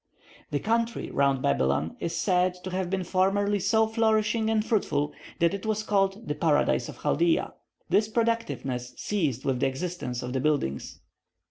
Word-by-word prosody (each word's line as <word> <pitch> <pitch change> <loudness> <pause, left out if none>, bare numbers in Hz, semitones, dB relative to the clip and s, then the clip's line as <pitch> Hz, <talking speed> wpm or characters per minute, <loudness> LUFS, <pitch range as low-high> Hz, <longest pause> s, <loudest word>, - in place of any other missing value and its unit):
The 145 - 0
country 230 +3 -1
round 140 -1 +2
Babylon 70 +4 +1
is 170 0 -3
said 180 -1 +2
to 185 - -5
have 185 -1 -2
been 190 0 -1
formerly 200 +3 +1
so 220 +4 +3
flourishing 220 0 +1
and 220 -1 +1
fruitful, 150 -10 0 0.2
that 170 +2 +2
it 200 - -4
was 215 -1 -1
called 200 +1 0
the - - 0
Paradise 150 0 +1
of - - -10
Chaldea. 340 -1 +2 0.3
This 210 +1 +3
productiveness 215 - -1
ceased 150 - -1
with 130 -2 0
the 135 - +2
existence 135 -3 -4
of 125 0 -4
the 135 - 0
buildings. 140 - -1
185 Hz, 160 wpm, -27 LUFS, 140-220 Hz, 0.3 s, so